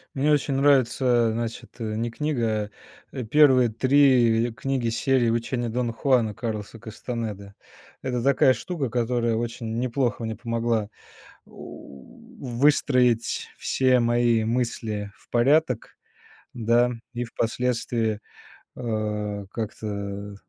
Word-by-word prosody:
Мне 140 +3 +2
очень 145 -1 +1
нравится, 130 -3 +3
а, - - 0
значит, 115 0 -5
не 110 +1 -2
книга, 115 -6 -1 0.4
э, 125 - -5
первые 130 0 +5
3 120 -2 +3
книги 130 0 -1
серии 120 +1 +1
"Учения 120 +1 -1
Дона 120 0 -2
Хуана" 115 -3 +2
Карлоса 110 -1 -5
Кастанеды. 110 -3 -6 0.5
Это 125 -2 -2
такая 135 -1 +4
штука, 140 +2 -4
которая 120 -1 0
очень 115 -1 -4
неплохо 120 -2 -1
мне 110 -1 -3
помогла, 115 -2 -1 0.6
о, - - -22
у, 70 -2 -13
выстроить 125 -2 +2
все 130 -1 +2
мои 120 -1 +2
мысли 110 -3 -2
в - - -26
порядок, 130 0 +1 0.6
да, 120 +1 +2 0.2
и 120 0 -2
впоследствии, 115 -2 -1 0.6
э, 105 -3 -3
как-то 100 -2 -5
120 Hz, 110 wpm, -25 LUFS, 110-125 Hz, 0.6 s, первые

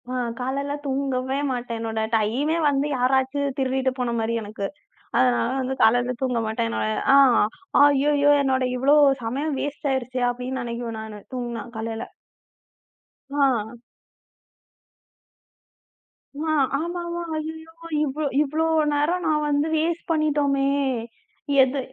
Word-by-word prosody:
அ - - -5 0.3
காலைல 275 +3 -2
தூங்கவே 265 -1 -1 0.2
மாட்டேன். 245 -2 -3
என்னோட 225 -1 -3 0.2
டைமெ 240 +9 +1
வந்து 280 +1 0
யாராச்சு 265 +2 +1 0.2
திருடிட்டு 265 -1 0
போன 245 -1 -1
மாரி 225 +1 -1
எனக்கு. 205 -1 -4 0.5
அதனால 120 -2 +3
வந்து 260 +1 -2
காலைல 245 +3 +4
தூங்க 250 -3 0
மாட்டேன் 220 - -1
நான் 110 0 -1
ய - - -1 0.2
"ஆ, - - +8 0.7
ஐய்யயோ! 290 0 +4
என்னோட 260 -1 +1
இவ்ளோ 270 +4 +4 0.3
சமயம் 275 +6 -2
வேஸ்டாயிருச்சே!" 265 -3 -2
அப்டின்னு 250 +2 -4
நினைக்குவேன் 235 -1 -5
நானு. 215 -1 -8
தூங்குனா, 240 -3 -4
காலைல. 225 0 -4 1.3
ஆ. 245 -5 0 2.6
ஆ 315 +1 -1 0.3
ஆமாமா! 345 +1 -4 0.2
ஐய்யயோ! 320 +1 -6 0.3
இவ்ளோ 300 +1 -2 0.2
இவ்ளோ 305 +2 0 0.3
நேரம் 305 +5 +1
நான் 305 -1 +1
வந்து 290 +1 +1
வேஸ்ட் 330 +2 -1
பண்ணிட்டோமே! 290 -3 +1 1.0
எது 265 +2 -1
265 Hz, 115 wpm, -24 LUFS, 235-290 Hz, 2.6 s, ஆ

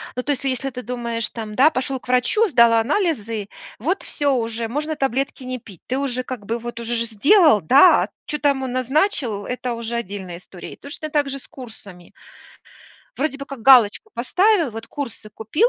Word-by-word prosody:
Ну, 250 - -3
то 290 - -1
есть, 275 - -2
если 270 0 -1
ты 250 -1 -7
думаешь, 235 -1 -3
там 215 -2 -7 0.2
пошел 260 +1 -2
к - - -19
врачу, 255 - +3
сдал 235 -4 +5
анализы, 230 - 0 0.3
вот 345 - -1
всё 285 -2 0
уже, 230 -1 -2
можно 300 +5 -3
таблетки 270 0 -2
не 255 0 -5
пить, 195 -6 -15
ты 255 - -1
уже, 255 -2 -2
как 245 -6 -7
бы, 230 +2 -2
вот 235 0 -7
уже 235 +1 -2
же 230 0 0
сделал, 275 - +4
да? 275 - +6
А - - -5 0.2
чё 300 - -4
там 280 -2 +1
он 255 - -3
назначил- 255 - 0
это 250 -1 -3
уже 235 0 -4
отдельная 190 -6 -5
история. 180 0 -11
И - - -16
точно 300 +2 -7
так 290 -2 +1
же 275 0 -5
с - - -14
курсами 205 -8 -12 1.1
вроде 275 -1 -1
бы 275 - -7
как 270 -5 -9
галочку 260 - +5
поставил, 360 - +2
вот 225 +1 -8
курсы 235 -6 -7
купил 225 - +1
250 Hz, 195 wpm, -21 LUFS, 225-280 Hz, 1.1 s, да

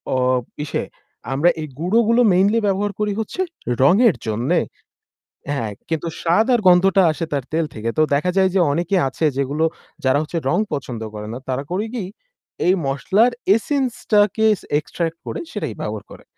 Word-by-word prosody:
অ - - +2 0.5
ইসে 145 - -2 0.5
আমরা 150 +6 +4
এই 155 - -4
গুঁড়ো 185 +8 +2
গুলো 235 +2 +4
মেইনলি 200 +5 +3
ব্যবহার 200 +1 0
করি 210 -1 0
হচ্ছে 220 - -3 0.4
রঙের 200 - +5
জন্যে। 110 +4 +1 0.9
হ্যাঁ, 115 -7 -2 0.2
কিন্তু 160 +1 -2
স্বাদ 175 +7 +3
আর 240 - +4
গন্ধটা 190 +2 +5
আসে 165 +2 -3
তার 140 -2 -1
তেল 165 0 +1
থেকে। 110 +1 -3
তো - - +4
দেখা 180 +6 +1
যায় 190 -1 +4
যে - - +4
অনেকে 175 +6 0
আছে 135 +4 -2
যেগুলো 140 +4 0 0.4
যারা 130 +2 +3
হচ্ছে 160 +2 -4
রং 175 - +2 0.2
পছন্দ 125 -5 -4
করে 105 0 -6
না। 120 - -5
তারা 130 +2 -1
করে 200 +4 -1
কি 205 -6 -3 0.6
এই 185 - +5
মসলার 195 - +2 0.2
এসেন্স 260 +2 0 0.2
টাকে 210 +1 +4 0.3
এক্সট্রাক্ট 165 +1 -4
করে - - -4
সেটাই - - -4
ব্যবহার - - -4
করে। - - -12
175 Hz, 170 wpm, -20 LUFS, 140-205 Hz, 0.9 s, রঙের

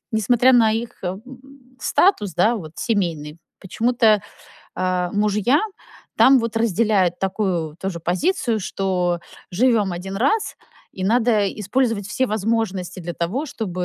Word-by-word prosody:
несмотря 240 +4 +3
на 225 -3 +5
их, 230 +1 -3
м, 185 +2 -3 0.6
статус, 210 - +2
да, 220 +6 +3
вот 155 -6 -8
семейный, 165 -8 -2 0.2
почему-то, 220 +1 +2 0.5
э, 185 -1 0
мужья 210 +7 +2 0.6
там 265 0 +6
вот 230 -1 -3
разделяют 210 -5 +1
такую 185 -5 -2
тоже 190 -2 -4
позицию, 225 - 0
что 180 -2 -1 0.3
живём 215 -1 +2
1 190 +3 -6
раз 280 - 0 0.4
и 190 - -7
надо 220 -1 +2
использовать 215 -1 0
все 260 +5 -1
возможности 205 -4 -2
для 175 0 -6
того, 205 - -2
чтобы, 185 - -4
205 Hz, 125 wpm, -21 LUFS, 180-230 Hz, 0.6 s, там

